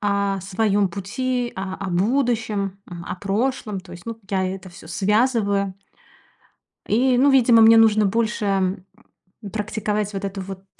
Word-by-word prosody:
о 200 -1 0
своем 200 +1 +1
пути, 240 +7 -3
а, 190 0 -4
о 195 -2 -5
будущем, 215 -1 0
а, 175 -1 -7
о - - -6
прошлом. 210 +1 -2
То 180 -1 -14
есть, 175 +3 -12
ну, 230 -1 -5
я 190 -1 +1
это 185 0 -6
всё 175 -2 -14
связываю. 200 0 +1 1.1
И, 250 +4 +3
ну, 280 +3 +5
видимо, 245 -4 +5
мне 225 +1 +8
нужно 215 -2 +5
больше, 220 +1 -1
м, 190 -1 0 0.7
практиковать 210 -1 -2
вот 195 0 -4
это 195 0 -4
вот 190 0 -8
200 Hz, 150 wpm, -22 LUFS, 190-225 Hz, 1.1 s, мне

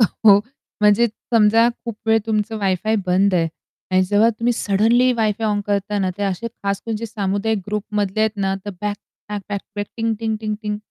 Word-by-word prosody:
का 225 - +7 0.3
ओ? 200 - +8 0.4
म्हणजे 210 +3 +5 0.3
समजा 225 +1 +5 0.2
खूप 230 -3 -5
वेळ 225 0 +5
तुमचं 215 0 -1
वायफाय 200 +3 0
बंद 190 +2 +3
आहे 165 -2 +2 0.4
आणि 185 0 +4
जेव्हा 205 +4 +4
तुम्ही 240 +1 +2
सडनली 230 +4 +3
वायफाय 220 -1 0
ऑन 205 -1 +1
करताना 200 -1 0
ते - - -2
असे 195 +3 -2
खास 200 -3 -4
म्हणजे 225 0 -3
सामुदायिक 205 0 -1
ग्रुपमधले 210 -1 -2
आहेत 220 0 +1
ना, 195 -1 0
तर 205 - -4
बॅक 210 -1 -2 0.3
बॅक-बॅक-बॅक, 205 0 -5
टिंग-टिंग-टिंग-टिंग. 220 -2 -2
210 Hz, 160 wpm, -20 LUFS, 200-220 Hz, 0.4 s, ओ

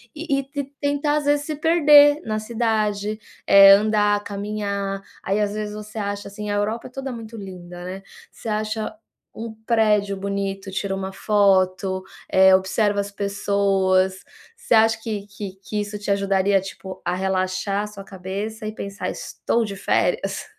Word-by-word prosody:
e 300 -3 -1
e 275 - -3
te 280 +1 -4 0.2
tentar 285 +1 +1
às 295 - -2
vezes 290 0 +2
se 310 - -3
perder 295 -2 +6
na 215 -1 -1
cidade, 215 -2 -1 0.3
é, 195 0 +9
andar, 205 -1 +2
caminhar. 200 -1 -3 0.2
Aí 195 +2 0
às 205 -1 0
vezes 210 0 -4
você 215 +1 -7
acha 200 0 -3
assim 210 +1 -6
a 205 - 0
Europa 215 +3 -1
é - - -13
toda 270 +1 -5
muito 230 -1 -8
linda, 180 -3 -9
né, 185 +2 -6 0.3
você 225 - -8
acha 215 +1 -2 0.5
um 225 0 -6
prédio 210 -4 +2
bonito, 195 0 -3
tira 195 0 -2
uma 190 0 -4
foto, 190 -2 +2 0.3
eh, 190 0 +6
observa 200 +2 +1
as 200 0 -3
pessoas. 195 -2 +1 0.4
Você 475 - -1
acha 225 0 +5
que 210 -3 -4
que 205 -2 -8
que 210 +1 -2
isso 205 0 -5
te 205 - -6
ajudaria, 195 0 +2
tipo, 190 0 -9
a - - 0
relaxar 190 +1 -1
a 210 - -4
sua 200 -1 -10
cabeça 200 +4 -6
e 215 - -4
pensar: 200 0 -4
"estou 235 0 -2
de 200 -2 -6
férias", 190 - 0
205 Hz, 165 wpm, -22 LUFS, 195-220 Hz, 0.5 s, é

